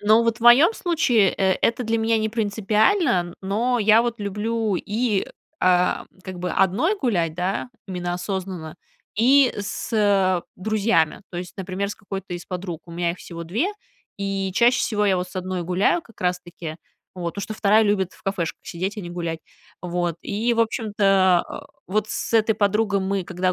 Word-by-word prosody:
Но 215 Hz, +2 st, +5 dB
вот 230 Hz, -1 st, +1 dB
в -, -, -25 dB
моем 245 Hz, -, +7 dB
случае, 245 Hz, -, +2 dB
э 190 Hz, -1 st, +2 dB
это 235 Hz, +2 st, +1 dB
для 225 Hz, +1 st, 0 dB
меня 225 Hz, 0 st, +2 dB
не 220 Hz, 0 st, 0 dB
принципиально, 215 Hz, -, +1 dB
но 230 Hz, +6 st, 0 dB
я 215 Hz, +1 st, +6 dB
вот 235 Hz, -1 st, -3 dB
люблю 210 Hz, +1 st, -1 dB
и, 210 Hz, +2 st, -1 dB, 0.3 s
а, 180 Hz, 0 st, +3 dB, 0.2 s
как 185 Hz, -1 st, -7 dB
бы 180 Hz, 0 st, -3 dB
одной 220 Hz, -, +2 dB
гулять, 180 Hz, -, 0 dB
да, 185 Hz, +7 st, -2 dB, 0.2 s
именно 180 Hz, -1 st, -3 dB
осознанно, 180 Hz, -3 st, -5 dB, 0.4 s
и 260 Hz, +4 st, +5 dB
с, 205 Hz, +3 st, -5 dB
э, 195 Hz, -4 st, +3 dB
друзьями, 205 Hz, -5 st, +1 dB
то 175 Hz, -, -7 dB
есть, 180 Hz, 0 st, -7 dB
например, 190 Hz, +1 st, -3 dB
с -, -, -7 dB
какой-то 195 Hz, -2 st, -7 dB
из 175 Hz, -, -8 dB
подруг. 180 Hz, -3 st, -5 dB
У 170 Hz, -, -11 dB
меня 170 Hz, 0 st, 0 dB
их 175 Hz, -, -7 dB
всего 170 Hz, -1 st, -8 dB
2, 205 Hz, -, -1 dB, 0.5 s
и 195 Hz, -1 st, -2 dB
чаще 240 Hz, +4 st, +4 dB
всего 210 Hz, -3 st, 0 dB
я 195 Hz, -2 st, +3 dB
вот 180 Hz, 0 st, -3 dB
с 185 Hz, -, -15 dB
1 185 Hz, -1 st, -3 dB
гуляю 185 Hz, -, +2 dB
как 230 Hz, -, -20 dB
раз 180 Hz, 0 st, 0 dB
таки, 170 Hz, -3 st, -8 dB, 0.4 s
вот, 170 Hz, -2 st, -4 dB
потому 200 Hz, -, -4 dB
что 215 Hz, -, -5 dB
2 215 Hz, +1 st, +4 dB
любит 205 Hz, -3 st, +1 dB
в -, -, -20 dB
кафешках 185 Hz, -4 st, -3 dB
сидеть 190 Hz, +5 st, -4 dB
и -, -, -4 dB
не 175 Hz, -3 st, -7 dB
гулять. 170 Hz, -2 st, -4 dB, 0.4 s
Вот, 175 Hz, -1 st, -1 dB
и, 225 Hz, +4 st, 0 dB
в 230 Hz, -, +2 dB
общем-то, 200 Hz, -5 st, +3 dB
о, -, -, -8 dB, 0.2 s
вот 210 Hz, +2 st, 0 dB
с -, -, -4 dB
этой 220 Hz, -1 st, +3 dB
подругой 205 Hz, 0 st, +1 dB
мы, 190 Hz, 0 st, -1 dB
когда 185 Hz, 0 st, -1 dB
195 Hz, 185 wpm, -23 LUFS, 180-220 Hz, 0.5 s, моем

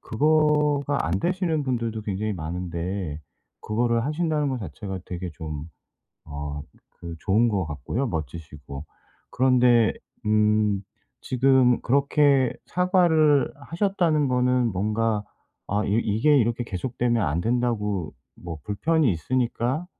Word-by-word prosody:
그거가 150 Hz, +1 st, +2 dB
안 85 Hz, +3 st, 0 dB
되시는 170 Hz, -, 0 dB
분들도 115 Hz, -4 st, -2 dB
굉장히 105 Hz, +1 st, -2 dB
많은데 85 Hz, -1 st, -4 dB, 0.4 s
그거를 115 Hz, +1 st, 0 dB
하신다는 150 Hz, -1 st, 0 dB
거 130 Hz, -, -2 dB
자체가 95 Hz, 0 st, -6 dB
되게 90 Hz, 0 st, -5 dB
좀 75 Hz, -1 st, -6 dB, 0.6 s
어 75 Hz, -1 st, -5 dB, 0.4 s
그 85 Hz, -1 st, -7 dB
좋은 110 Hz, +5 st, +2 dB
것 95 Hz, -4 st, 0 dB
같고요 115 Hz, -, -3 dB
멋지시고. 75 Hz, -, -6 dB, 0.5 s
그런데 125 Hz, -3 st, +4 dB, 0.3 s
음 105 Hz, -1 st, +2 dB, 0.4 s
지금 130 Hz, -1 st, +3 dB
그렇게 140 Hz, 0 st, +3 dB, 0.6 s
사과를 150 Hz, -4 st, +4 dB
하셨다는 165 Hz, -1 st, 0 dB
거는 125 Hz, -1 st, +2 dB
뭔가 105 Hz, +2 st, 0 dB, 0.4 s
아 105 Hz, +2 st, 0 dB
이 100 Hz, -, 0 dB
이게 115 Hz, +8 st, +3 dB
이렇게 120 Hz, +1 st, 0 dB
계속되면 120 Hz, +2 st, -1 dB
안 75 Hz, +4 st, 0 dB
된다고 105 Hz, -7 st, -1 dB, 0.2 s
뭐 85 Hz, -2 st, -7 dB
불편이 150 Hz, +6 st, +1 dB
있으니까 125 Hz, -, -1 dB
115 Hz, 255 characters per minute, -25 LUFS, 95-135 Hz, 0.6 s, 그런데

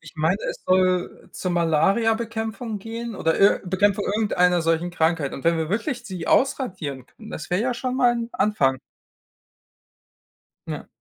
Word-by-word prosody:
Ich -, -, -14 dB
meine, 160 Hz, +5 st, +2 dB
es -, -, -10 dB
soll 185 Hz, -1 st, +1 dB
zur 185 Hz, -, -3 dB
Malariabekämpfung 220 Hz, +6 st, 0 dB
gehen 230 Hz, +2 st, -6 dB
oder 165 Hz, -3 st, 0 dB
ir 200 Hz, -, +5 dB
Bekämpfung 200 Hz, +2 st, +1 dB
irgendeiner 180 Hz, -4 st, +2 dB
solchen 165 Hz, +2 st, 0 dB
Krankheit. 160 Hz, -4 st, 0 dB
Und 135 Hz, -, -8 dB
wenn 170 Hz, 0 st, +3 dB
wir 160 Hz, -1 st, -2 dB
wirklich 235 Hz, +4 st, -2 dB
sie 185 Hz, -6 st, -6 dB
ausradieren 185 Hz, -, 0 dB
können, 220 Hz, -, -14 dB
das 155 Hz, -, -7 dB
wäre 180 Hz, +2 st, +1 dB
ja 250 Hz, -1 st, 0 dB
schon 255 Hz, +1 st, -3 dB
mal 245 Hz, -2 st, +4 dB
'n 235 Hz, -1 st, -3 dB
Anfang. 135 Hz, -11 st, +1 dB, 1.9 s
Ja. -, -, -6 dB
190 Hz, 155 wpm, -23 LUFS, 170-225 Hz, 1.9 s, ir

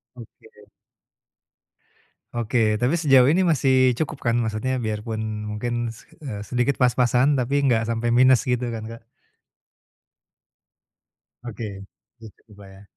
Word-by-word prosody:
Oke. 120 Hz, -3 st, -16 dB, 1.7 s
Oke. 115 Hz, -2 st, 0 dB
Tapi 125 Hz, +7 st, +1 dB
sejauh 135 Hz, -7 st, +4 dB
ini 165 Hz, +7 st, +3 dB
masih 130 Hz, -6 st, +3 dB
cukup 155 Hz, -2 st, -3 dB
kan? 120 Hz, 0 st, +2 dB
Maksudnya 120 Hz, +3 st, -2 dB
biarpun 110 Hz, -1 st, -4 dB, 0.3 s
mungkin 120 Hz, +2 st, -3 dB
se 115 Hz, -, -14 dB, 0.2 s
eee 105 Hz, -7 st, -6 dB
sedikit 125 Hz, +2 st, -1 dB
pas-pasan, 125 Hz, +2 st, +2 dB
tapi 135 Hz, +1 st, 0 dB
enggak 125 Hz, -5 st, +2 dB
sampai 115 Hz, +1 st, -2 dB
minus 130 Hz, 0 st, +5 dB
gitu 125 Hz, -1 st, -1 dB
kan 110 Hz, -1 st, -6 dB
Kak? 115 Hz, 0 st, -10 dB, 2.4 s
Oke. 105 Hz, -4 st, -7 dB, 0.4 s
gitu 110 Hz, 0 st, -16 dB
Kak 100 Hz, -1 st, -14 dB
ya. 95 Hz, +1 st, -15 dB
120 Hz, 120 wpm, -23 LUFS, 110-130 Hz, 2.4 s, minus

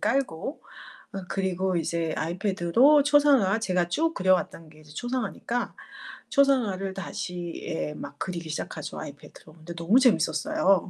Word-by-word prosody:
깔고 270 Hz, -, -1 dB, 0.5 s
어 195 Hz, -, -4 dB
그리고 190 Hz, -1 st, 0 dB
이제 165 Hz, 0 st, -1 dB
아이패드로 195 Hz, -, +3 dB
초상화 280 Hz, -8 st, +4 dB
제가 180 Hz, -5 st, 0 dB
쭉 325 Hz, -, 0 dB
그려 185 Hz, -1 st, +3 dB
왔던 165 Hz, -3 st, -3 dB
게 155 Hz, 0 st, -17 dB
이제 150 Hz, 0 st, -16 dB
초상화니까 245 Hz, +2 st, -3 dB, 0.5 s
초상화를 220 Hz, -9 st, +2 dB
다시 175 Hz, -2 st, -5 dB
예. 160 Hz, -3 st, -3 dB
막 145 Hz, 0 st, -8 dB
그리기 170 Hz, -3 st, -4 dB
시작하죠, 155 Hz, -, -5 dB
아이패드로. 155 Hz, -, -11 dB
근데 165 Hz, +1 st, -10 dB
너무 170 Hz, +10 st, +4 dB
재미있었어요. 250 Hz, -, +2 dB
190 Hz, 335 characters per minute, -26 LUFS, 170-250 Hz, 0.5 s, 초상화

